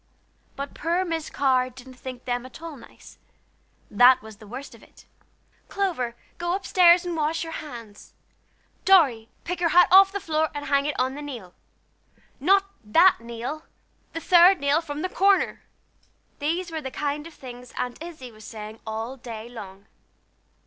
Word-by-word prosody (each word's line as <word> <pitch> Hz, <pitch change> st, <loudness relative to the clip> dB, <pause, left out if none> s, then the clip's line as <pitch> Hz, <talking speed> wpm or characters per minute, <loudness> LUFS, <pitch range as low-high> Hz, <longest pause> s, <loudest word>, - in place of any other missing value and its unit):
But 280 Hz, 0 st, -6 dB
poor 345 Hz, +4 st, -1 dB
Miss 325 Hz, -3 st, -3 dB
Carr 255 Hz, -2 st, +2 dB
didn't 255 Hz, +1 st, -13 dB
think 255 Hz, -1 st, -9 dB
them 245 Hz, -1 st, -2 dB
at 255 Hz, +3 st, -12 dB
all 330 Hz, -2 st, -8 dB
nice; 240 Hz, -, -16 dB, 0.7 s
that 245 Hz, +4 st, +7 dB
was 220 Hz, -1 st, -12 dB
the 215 Hz, -1 st, -14 dB
worst 255 Hz, +6 st, -8 dB
of -, -, -16 dB
it. -, -, -19 dB, 0.6 s
"Clover, 320 Hz, -12 st, -2 dB, 0.2 s
go 345 Hz, 0 st, -1 dB
up 385 Hz, -, -5 dB
stairs 355 Hz, -1 st, +5 dB
and 350 Hz, -1 st, -3 dB
wash 320 Hz, +1 st, -1 dB
your 325 Hz, 0 st, -7 dB
hands! 230 Hz, -8 st, -9 dB, 0.7 s
Dorry, 270 Hz, -13 st, +4 dB
pick 355 Hz, +1 st, -4 dB
your 345 Hz, -1 st, +2 dB
hat 355 Hz, +2 st, +6 dB
off 390 Hz, +1 st, +8 dB
the 400 Hz, -, -3 dB
floor 315 Hz, -3 st, 0 dB
and 290 Hz, 0 st, -4 dB
hang 280 Hz, 0 st, +2 dB
it 295 Hz, -, -3 dB
on 260 Hz, +1 st, +1 dB
the 290 Hz, -, -7 dB
nail! 240 Hz, -11 st, -8 dB, 0.9 s
Not 390 Hz, +7 st, +4 dB, 0.2 s
that 330 Hz, -, +5 dB
nail 235 Hz, +7 st, -6 dB, 0.5 s
the 330 Hz, -, -3 dB
third 355 Hz, +2 st, +6 dB
nail 285 Hz, +3 st, +2 dB
from 300 Hz, -2 st, -6 dB
the -, -, +1 dB
corner!" 390 Hz, +1 st, +2 dB, 0.8 s
These 335 Hz, +4 st, -2 dB
were 320 Hz, -1 st, -4 dB
the 265 Hz, -, -5 dB
kind 295 Hz, +3 st, -3 dB
of 335 Hz, -, -15 dB
things 245 Hz, -1 st, -11 dB
Aunt 250 Hz, +3 st, -4 dB
Izzie 315 Hz, -7 st, -9 dB
was 215 Hz, -1 st, -15 dB
saying 215 Hz, 0 st, -9 dB
all 225 Hz, +4 st, -4 dB
day 230 Hz, -3 st, -8 dB
long. 200 Hz, -4 st, -10 dB
285 Hz, 170 wpm, -25 LUFS, 245-335 Hz, 0.9 s, off